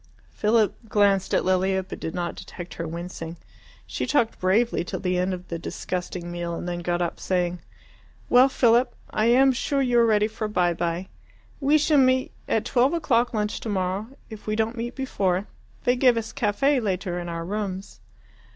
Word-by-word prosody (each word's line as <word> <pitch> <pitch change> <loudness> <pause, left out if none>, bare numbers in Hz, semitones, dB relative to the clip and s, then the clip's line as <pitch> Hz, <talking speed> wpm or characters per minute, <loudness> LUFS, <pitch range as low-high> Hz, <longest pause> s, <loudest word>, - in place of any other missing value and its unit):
Philip 215 0 +2
glanced 200 -3 +3
at - - +2
Lilia 190 +1 +2
but 185 - -8
did 160 - -5
not 175 -1 -2
detect 175 -1 -9
her 165 - -5
wincing. 170 0 -6 0.5
She - - -3
talked 240 -6 +1
bravely 200 +2 +2
till 175 - -5
the 180 -1 0
end 180 +1 0
of 180 0 -6
the 170 - -4
disgusting 175 0 -5
meal, 175 -1 -3
and 175 - -5
then 175 0 -3
got 175 0 -1
up 170 - -4
saying, 180 -1 -1 0.7
"Well, 250 +2 +6
Philip, 245 0 +3 0.2
I 215 - +1
am 265 +3 +6
sure 275 +2 -1
you 245 -3 +3
are 235 - +5
ready 210 -1 +3
for 220 0 -4
by 180 -4 +1
bye. 170 +2 -2 0.5
We 290 +2 +4
shall 300 -1 +3
meet 260 0 +3 0.2
at 220 - 0
twelve 260 +5 +2
o'clock 245 -7 +2
lunch 210 -2 -1
tomorrow, 195 -1 -2 0.2
if 220 -2 -11
we 215 - 0
don't 220 +2 0
meet 240 +1 -4
before. 195 -8 0 0.4
They 245 - +3
give 250 -2 +4
us 225 -1 -4
caffe 260 +6 +2
later 185 -3 -2
in 175 0 -5
our 165 0 -4
rooms." 195 - -4
205 Hz, 185 wpm, -25 LUFS, 180-240 Hz, 0.7 s, Well